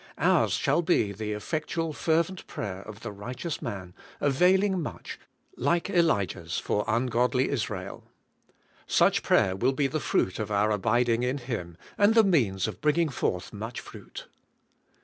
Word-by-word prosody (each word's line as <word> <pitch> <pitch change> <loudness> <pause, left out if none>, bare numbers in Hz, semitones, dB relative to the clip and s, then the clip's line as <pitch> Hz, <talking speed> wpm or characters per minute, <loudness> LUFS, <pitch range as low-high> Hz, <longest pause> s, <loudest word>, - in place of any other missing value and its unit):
Ours - - +3
shall - - +2
be 155 - +2
the 105 +2 -4
effect 155 +9 -4
ual, 165 -2 -1
fervent 170 +4 0
prayer 95 -2 -5
of 105 +1 -10
the - - -5
righteous 125 - -5
man, 95 -3 -6 0.3
availing 185 +6 +3
much, 150 - -7 0.4
like 170 +3 0
Elijah's 100 - +1
for 105 - 0
ungodly 125 +2 +1
Israel. 125 -7 -4 0.8
Such - - +3
prayer 95 - +3
will 125 +7 +1
be 140 +1 0
the 155 +3 -1
fruit 95 -9 0
of 105 -1 -3
our 105 +1 +2
abiding 115 +3 +2
in 125 +3 0
Him, 110 -10 -5 0.2
and 205 +2 +5
the 225 - +7
means 115 - +2
of - - -7
bringing 150 +2 +2
forth 90 -8 -2
much 110 +4 -5
fruit. - - -10
125 Hz, 150 wpm, -27 LUFS, 105-160 Hz, 0.8 s, the